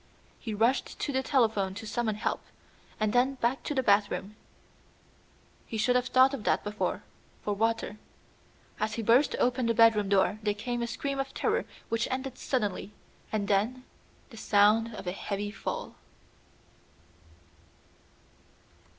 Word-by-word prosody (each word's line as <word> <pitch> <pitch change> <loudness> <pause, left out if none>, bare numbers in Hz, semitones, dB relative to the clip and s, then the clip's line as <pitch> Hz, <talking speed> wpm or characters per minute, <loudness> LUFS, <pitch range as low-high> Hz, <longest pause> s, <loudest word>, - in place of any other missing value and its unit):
He 220 -3 -4
rushed 235 +5 +1
to 290 - -2
the 265 - +1
telephone 220 -8 +1
to 220 +2 -7
summon 220 -1 -1
help, 215 - -2 0.6
and 215 -1 +1
then 255 +3 +3
back 250 +1 0
to 295 - -2
the 260 - +1
bathroom 205 -1 +1 1.3
he 225 - -4
should 245 +4 +2
have 250 0 +2
thought 260 +2 +5
of 260 -6 -4
that - - +1
before 210 0 -2 0.4
for 210 - -1
water. 225 0 -1 0.8
As 215 0 -1
he 230 - -3
burst 240 +7 +4
open 250 -1 +1
the 230 - +1
bedroom 215 -3 +5
door 200 +1 +2
there 210 -1 0
came 240 +3 -3
a 235 - -1
scream 275 +3 -3
of 270 0 -3
terror - - 0 0.2
which 230 0 0
ended 260 0 -4
suddenly, 210 -5 -2 0.4
and 210 -2 -1
then 220 +6 +1 0.5
the 225 - -11
sound 215 +2 +4
of - - -8
a 180 - -1
heavy 205 +2 -4
fall. 205 - -5
225 Hz, 150 wpm, -29 LUFS, 210-250 Hz, 1.3 s, thought